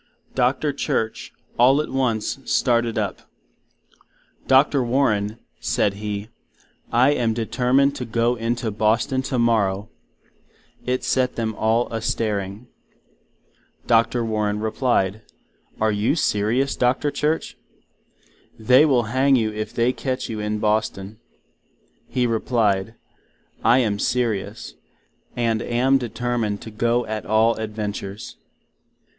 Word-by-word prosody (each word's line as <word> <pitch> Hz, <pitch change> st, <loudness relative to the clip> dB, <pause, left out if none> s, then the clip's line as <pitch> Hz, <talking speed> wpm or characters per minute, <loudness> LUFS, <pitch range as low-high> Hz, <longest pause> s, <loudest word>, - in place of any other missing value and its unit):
Dr. 130 Hz, +3 st, +1 dB
Church, 110 Hz, -5 st, -2 dB, 0.3 s
all 130 Hz, +4 st, +6 dB
at 150 Hz, -, -2 dB
once, 125 Hz, -2 st, -1 dB
started 120 Hz, -2 st, +1 dB
up—Dr. 130 Hz, +6 st, -2 dB
Warren, 115 Hz, -4 st, +1 dB, 0.2 s
said 100 Hz, -, 0 dB
He, 105 Hz, +1 st, -5 dB, 0.6 s
I 125 Hz, +4 st, +4 dB
am 115 Hz, -6 st, 0 dB
determined 125 Hz, +4 st, +1 dB
to 125 Hz, -, -4 dB
go 115 Hz, +1 st, +1 dB
into 115 Hz, 0 st, -2 dB
Boston 110 Hz, +5 st, +1 dB
tomorrow—(it 115 Hz, +1 st, -3 dB
set 125 Hz, -1 st, 0 dB
them 110 Hz, -1 st, -2 dB
all 115 Hz, +3 st, +1 dB
a 115 Hz, -, -2 dB
stairing)—Dr. 115 Hz, +2 st, -3 dB
Warren 105 Hz, -1 st, -1 dB
replyed, 110 Hz, -2 st, 0 dB, 0.6 s
Are 110 Hz, 0 st, +2 dB
you 105 Hz, +7 st, +1 dB
serious, 120 Hz, 0 st, +1 dB
Dr. 130 Hz, +4 st, +1 dB
Church? 155 Hz, +3 st, -1 dB, 1.0 s
they 130 Hz, +7 st, +5 dB
will 130 Hz, -4 st, +3 dB
Hang 130 Hz, +5 st, +2 dB
you 110 Hz, -3 st, 0 dB
if 110 Hz, 0 st, -4 dB
they 120 Hz, +2 st, +1 dB
catch 130 Hz, -1 st, -3 dB
you 110 Hz, -2 st, -4 dB
in 105 Hz, 0 st, -2 dB
Boston. 105 Hz, -1 st, -1 dB, 0.9 s
He 125 Hz, -1 st, 0 dB
replyed, 110 Hz, -3 st, 0 dB, 0.7 s
I 115 Hz, +3 st, +5 dB
am 105 Hz, -5 st, +1 dB
serious, 110 Hz, -4 st, -2 dB, 0.6 s
and 115 Hz, -2 st, 0 dB
am 130 Hz, +4 st, +2 dB
determined 120 Hz, -3 st, -2 dB
to 110 Hz, -, -9 dB
go 120 Hz, +3 st, 0 dB
at 110 Hz, 0 st, -4 dB
all 110 Hz, +2 st, +3 dB
adventures. 105 Hz, -2 st, -5 dB
115 Hz, 110 wpm, -22 LUFS, 105-125 Hz, 1.0 s, all